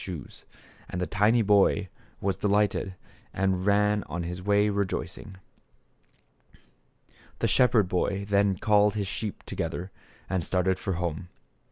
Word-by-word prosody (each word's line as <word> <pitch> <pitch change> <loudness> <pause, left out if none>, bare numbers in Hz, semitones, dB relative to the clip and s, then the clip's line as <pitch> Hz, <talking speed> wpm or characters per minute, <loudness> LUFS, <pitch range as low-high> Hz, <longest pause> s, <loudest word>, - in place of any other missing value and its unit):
57 90 -4 -5
shoes. - - -15 0.4
And 90 - -4
the 90 - 0
tiny 105 +6 +3
boy 100 -1 +3 0.3
was 100 -1 0
delighted 100 -2 0 0.4
and 95 0 0
ran 105 0 +3
on 85 0 -4
his 90 +2 -5
way 105 +2 +3
rejoicing. 100 -1 -3 2.0
The - - 0
shepherd 120 -6 +4
boy 95 +2 -1
then 100 -1 +2
called 105 +1 +3
his 105 -2 -1
sheep 105 +2 -5
to - - -7
gether 90 +2 -4 0.4
and 95 -2 -1
started 95 +2 0
for 95 - -2
home. 85 +1 -3
100 Hz, 140 wpm, -27 LUFS, 90-105 Hz, 2.0 s, shepherd